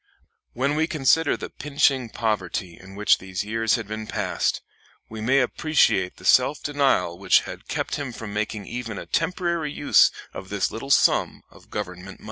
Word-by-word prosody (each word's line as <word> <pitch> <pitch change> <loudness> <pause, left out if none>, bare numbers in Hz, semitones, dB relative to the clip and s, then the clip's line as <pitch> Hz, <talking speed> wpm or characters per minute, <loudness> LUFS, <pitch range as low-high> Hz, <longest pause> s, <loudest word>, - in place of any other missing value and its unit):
When 140 +4 0
we 160 +1 +1
consider 155 +1 +2
the - - -7
pinching 140 -3 +1
poverty 100 -5 -2
in 95 +1 -14
which 105 +1 +3
these 95 0 -4
years 115 +1 +1
had 115 -4 -5
been 110 +1 -6
passed, - - -1 0.5
we 110 0 -7
may 130 +5 +3
appreciate 125 - +1
the - - -13
self 130 +4 +4
denial 140 -11 +2
denial 85 +1 -11
which 95 -1 +4
had - - -9
kept - - -2
him 140 -3 -4
from 110 -3 -8
making 105 -1 -3
even 115 -3 -5
a - - -6
temporary 170 -2 -1
use 145 0 +4 0.2
of 95 - -8
this 100 -2 -1
little 125 +5 -7
sum 140 - +3
of - - -19
government 90 -3 -5
money. - - -31
115 Hz, 180 wpm, -24 LUFS, 100-140 Hz, 0.5 s, self